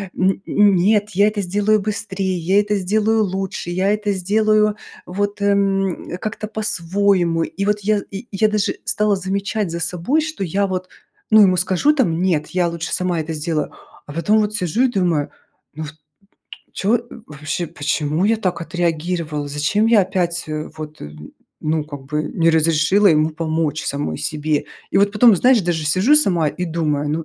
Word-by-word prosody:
н 190 +1 +1
н 205 -1 +4
нет, 205 +3 +2
я 200 +3 +3
это 210 -1 -1
сделаю 205 +3 +1
быстрее, 195 -3 -3
я 185 +5 +2
это 210 0 -1
сделаю 215 +3 +1
лучше, 190 -2 -4
я 190 +3 +1
это 210 -1 -1
сделаю 210 +2 +2 0.3
вот, 205 +2 -3
м, 195 -2 0
как-то 215 0 -4
по-своему. 190 -4 0
И 195 - -4
вот 210 0 +1
я 210 +1 +1
и 195 - -5
и - - -32
я 215 - +4
даже 210 -1 0
стала 210 -1 +1
замечать 195 0 -2
за 170 - -4
собой, 180 - 0
что 310 -10 -4
я 195 +3 0
вот, 185 -1 -4 0.4
ну, 215 - +8
ему 185 -3 +5
скажу 185 - +2
там: 175 - +1
"Нет, 160 -5 +1
я 180 -1 +1
лучше 170 -1 -4
сама 180 -2 0
это 160 +1 -4
сделаю". 155 0 -2 0.3
А 145 - -10
потом 210 +7 +2
вот 210 0 0
сижу 185 +7 0
и - - +5
думаю: 175 -8 0 0.5
"Ну, 155 - -5
вот, 150 0 -8 0.8
чё, 220 +5 +1 0.3
вообще, 150 +3 -4
почему 150 +3 -1
я 225 +1 +3
так 185 -5 -2
отреагировала? 165 -2 -2
Зачем 150 +10 0
я 225 -2 +5
опять, 175 -2 -1
э, 155 0 -4
вот 155 0 -8 0.6
ну 155 0 -1
как 145 -3 -9
бы 150 +1 -2
не 165 +1 +1
разрешила 165 +5 +3
ему 155 -1 +3
помочь 160 -1 -2
самой 140 - -3
себе?" 150 -1 -1 0.3
И - - +2
вот 200 0 +3
потом, 220 -2 +6
знаешь, 250 +3 +4
даже 165 -3 -1
сижу 190 - +4
сама 175 - +2
и 180 +4 -4
думаю: 150 -3 -1
"Ну 160 +1 -2
185 Hz, 175 wpm, -20 LUFS, 160-205 Hz, 0.8 s, ну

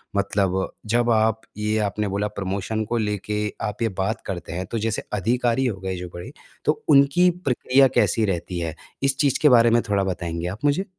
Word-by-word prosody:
मतलब 95 -2 0
जब 120 +2 +1
आप 110 0 +2 0.2
ये 105 +1 0
आपने 105 0 -1
बोला 100 +1 -1
प्रमोशन 100 +2 -3
को 120 +3 -1
लेके 105 -1 -2 0.3
आप 105 +1 -5
ये 115 - +2
बात 110 +4 -1
करते 90 -3 -5
हैं 90 +2 -3
तो 115 - -1
जैसे 110 0 -2
अधिकारी 120 +5 +1
हो 110 -6 -2
गए 95 -1 -3
जो 90 0 -6
बड़े, 85 0 -8 0.3
तो - - 0
उनकी 140 +5 +5 0.2
प्रक्रिया 135 +1 +4
कैसी 110 - +3
रहती 90 -2 -3
है 80 -2 -3 0.3
इस 135 0 +2
चीज़ 140 -3 +2
के 150 - +6
बारे 120 -2 +6
में 120 0 +4
थोड़ा 100 -1 +2
बताएँगे 85 -2 -3
आप 105 +10 -5
मुझे? 145 +7 +2
105 Hz, 195 wpm, -23 LUFS, 95-120 Hz, 0.3 s, के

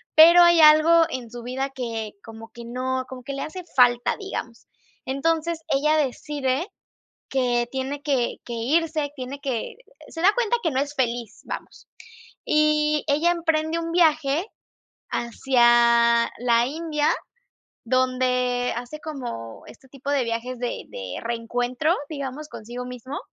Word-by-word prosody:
pero 340 +3 +9
hay 345 -1 +6
algo 310 +2 +7
en 245 -3 -5
su 240 0 -8
vida 265 +2 -3
que 230 -5 -5
como 225 0 -11
que 235 - -10
no 255 +2 -2
como 255 -1 -9
que 280 - -6
le 275 - -4
hace 365 +3 -7
falta, 245 -1 +4
digamos. 245 - -7 0.4
Entonces, 325 +4 -1
ella 300 +3 +2
decide 280 - -1 0.6
que 245 -2 +1
tiene 270 +2 -4
que 270 -5 0
que 240 - -6
irse, 300 +5 0
tiene 260 +2 -6
que 250 -5 -3 0.3
Se 325 - -7
da 400 +4 +5
cuenta 480 -1 +1
que 325 - +1
no 260 - 0
es 290 +1 -4
feliz, 240 -3 -2
vamos. - - -8 0.6
Y 305 0 +2
ella 305 +5 +3
emprende 325 -1 0
un 330 0 -4
viaje 315 0 +2 0.6
hacia 235 -1 +3
la 235 -1 +3
India, 300 +1 -1 0.8
donde 250 0 +1
hace 245 +6 -6
como 245 - -7
este 265 - -15
tipo 275 +1 -8
de 280 -3 +2
viajes 230 +2 -3
de 245 -1 -4
de 95 -2 -6
reencuentro, 245 +6 -1 0.2
digamos, 285 0 -6
consigo 240 +3 -7
mismo. 250 +3 -7
265 Hz, 140 wpm, -24 LUFS, 240-305 Hz, 0.8 s, pero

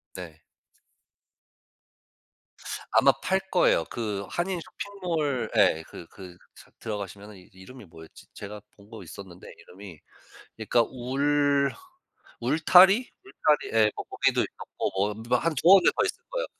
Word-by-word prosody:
네. 80 -4 -10 2.5
아마 - - +5
팔 190 +1 +1
거예요. 130 - +3
그 105 -4 -4
한인 175 0 -2
쇼핑몰 165 -10 -3
예 80 - +3
그 - - -11
그 90 -2 -12 0.2
삭 - - -18
들어가시면은 100 -1 -7
이제 95 +1 -19
이름이 125 +3 -13
뭐였지? 80 -1 -15
제가 105 +1 -9
본 100 0 -20
거 110 -4 -10
있었는데 90 0 -12
이름이. 95 -3 -13 0.6
그러니까 120 - +2
울, 140 +3 0 0.7
울타리? 180 - +5
울타리 150 - 0
예 105 -1 +4
거 - - -5
거기도 - - 0
있었고 - - -5
뭐 100 +2 -1
뭐 125 0 +3
한 165 +3 -1
두어 190 +4 +8
개 - - -2
더 - - +2
있을 480 - -4
거예요. - - -2
120 Hz, 265 characters per minute, -26 LUFS, 100-160 Hz, 2.5 s, 두어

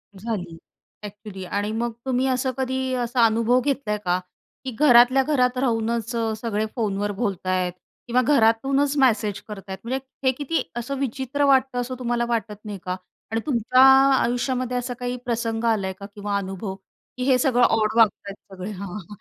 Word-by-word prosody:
झाली 190 -5 -5 0.5
ऍक्चुअली 205 -2 -8
आणि 205 +3 -2
मग 235 +1 -2
तुम्ही 260 0 +1
असं 255 0 0
कधी 260 0 -1
असा 240 0 +3
अनुभव 230 +3 +3
घेतलाय 255 -7 -1
का? 180 +1 +2 0.5
की 260 - -3
घरातल्या 255 -1 +6
घरात 255 -3 +1
राहूनच 230 -2 0 0.3
सगळे 220 -2 -1
फोनवर 205 -3 -1
बोलताय 185 -4 -1 0.4
किंवा 250 +1 +3
घरातूनच 275 +3 +2
मेसेज 215 -6 +2
करत 210 -2 -7
आहेत. 190 0 -5
म्हणजे 260 +3 -2 0.3
हे - - +6
किती 295 +3 -1
असं 245 +4 -3
विचित्र 270 +2 -1
वाटतं 265 -2 +3
असं 255 +1 -5
तुम्हाला 240 -1 0
वाटत 220 -3 -2
नाही 205 -2 -5
का? 180 0 -2 0.4
आणि 225 0 0
तुमच्या 255 -2 +3 0.3
आयुष्यामध्ये 250 0 0
असा 245 0 -3
काही 245 0 -3
प्रसंग 230 -1 -2
आलाय 190 -3 -2
का 200 - -8
किंवा 205 0 -2
अनुभव? 195 0 -5 0.4
की 250 - -2
हे 260 -1 +4
सगळं 245 -1 +3
ऑड 215 -1 +2
वागतायत 200 -2 +2 0.2
सगळे? 190 +3 -6
हां, 200 0 -6
हां. 205 -5 -8
235 Hz, 160 wpm, -23 LUFS, 210-255 Hz, 0.5 s, घरातल्या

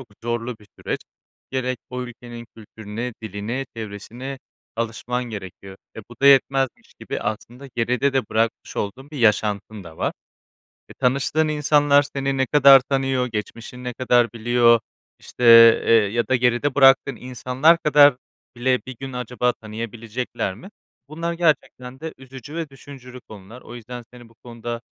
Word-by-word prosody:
çok 130 - -13
zorlu 120 0 -3
bir 105 - -19
süreç. - - -4 0.5
Gerek 130 -2 -2
o 125 0 -4
ülkenin 120 -1 -10
kültürüne, 110 +2 -7
diline, 110 +6 -4
çevresine 115 +5 -7 0.4
alışman 115 +2 -3
gerekiyor, 95 -3 -9 0.2
eee, 110 - -7
bu - - -10
da 140 - +6
yetmezmiş 135 -1 +3
gibi - - -5
aslında 120 +5 -6
geride 125 +4 +1
de 135 - +1
bırakmış 115 +1 -1
olduğun 130 +8 -5
bir 150 - -7
yaşantın 105 -2 0
da 80 -1 -12
var. 145 - -1 0.8
E, - - -13
tanıştığın 140 +4 +1
insanlar 145 -1 +3
seni 135 -1 -3
ne 130 0 +1
kadar 140 -2 +7
tanıyor, 135 -1 -1
geçmişini 115 +2 -7
ne 125 - -3
kadar 120 -2 +2
biliyor, 120 0 +3 0.4
işte, 125 - -7 0.4
eee, - - +4
ya 115 +1 +2
da 130 - +3
geride 125 +3 +1
bıraktığın 135 -2 +5
insanlar 130 +6 +2
kadar 145 -4 +5 0.4
bile 125 +1 +1
bir 130 -2 -8
gün 135 -1 -6
acaba 125 0 -1
tanıyabilecekler 115 -1 -5
mi? 125 - -12 0.4
Bunlar 165 +3 -4
gerçekten 145 -6 -1
de 160 0 -6
üzücü 130 +2 -11
ve 165 -3 -4
düşündürücü 130 -2 -12
konular. 110 +4 -12
O 120 - -11
yüzden 120 0 -9
seni 120 -1 -14
bu 115 - -23
konuda 120 0 -6
125 Hz, 150 wpm, -22 LUFS, 115-135 Hz, 0.8 s, kadar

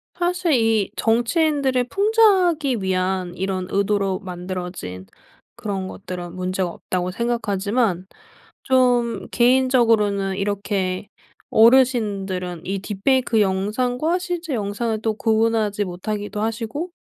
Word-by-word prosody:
사실 355 -1 0
이 225 -5 +2
정치인들을 260 +2 +1
풍자하기 370 - +3
위한 185 -1 -1
이런 185 -1 -3
의도로 200 -1 0
만들어진 180 - -6 0.5
그런 200 -5 -4
것들은 180 -2 -7
문제가 185 0 -2
없다고 180 +1 -3
생각하지만 205 -3 -1 0.6
좀 245 -5 +2
개인적으로는 230 -6 +3
이렇게 200 -1 -2 0.4
어르신들은 205 -8 +2
이 195 +1 -2
딥페이크 220 +4 +1
영상과 245 - 0
실제 350 -4 -4
영상을 215 0 -2
또 220 0 0
구분하지 220 -2 +1
못하기도 205 +3 -4
하시고 225 +10 -3
215 Hz, 280 characters per minute, -22 LUFS, 190-250 Hz, 0.6 s, 풍자하기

